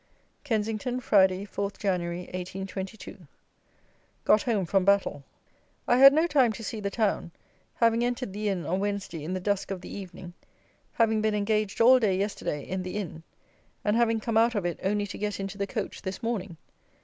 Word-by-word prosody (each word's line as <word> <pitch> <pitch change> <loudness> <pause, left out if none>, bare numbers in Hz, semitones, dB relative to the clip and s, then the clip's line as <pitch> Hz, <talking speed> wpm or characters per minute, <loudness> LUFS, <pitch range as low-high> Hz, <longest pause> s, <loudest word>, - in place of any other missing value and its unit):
Kensington, 225 0 -1
Friday, 190 -4 +3
4 200 0 -3
Jan. 190 -3 0
1822. 185 +2 -6 1.0
Got 215 - +5
home 215 -7 0
from 190 +2 +2
Battle. 195 -7 +2 0.6
I 245 - +4
had 275 +1 +11
no 315 +4 +3
time 275 -8 +3
to 225 - -8
see 220 +1 -4
the 200 -1 -2
town, 210 -5 0 0.5
having 230 0 +3
entered 245 -4 -2
the 210 +1 -1
Inn 180 -5 -2
on 185 +5 0
Wednesday 195 -5 -3
in 180 +5 -3
the - - -2
dusk 200 +1 -1
of 190 -2 -4
the - - -8
evening, 180 -2 -9 0.6
having 220 -2 +2
been 215 -1 +1
engaged 210 0 0
all 255 +3 +7
day 200 -6 +2
yesterday 195 -7 -2
in 190 0 -2
the 185 +2 -5
Inn, 170 -5 -5 0.6
and 210 +1 +2
having 230 -1 +2
come 225 0 -1
out 230 +1 +4
of 200 -4 -1
it 175 - -2
only 205 +2 0
to 200 - -8
get 210 -1 -2
into 195 0 -5
the 200 - -1
coach - - -4
this 190 +4 -6
morning. 205 -7 -3
200 Hz, 185 wpm, -27 LUFS, 190-225 Hz, 1.0 s, had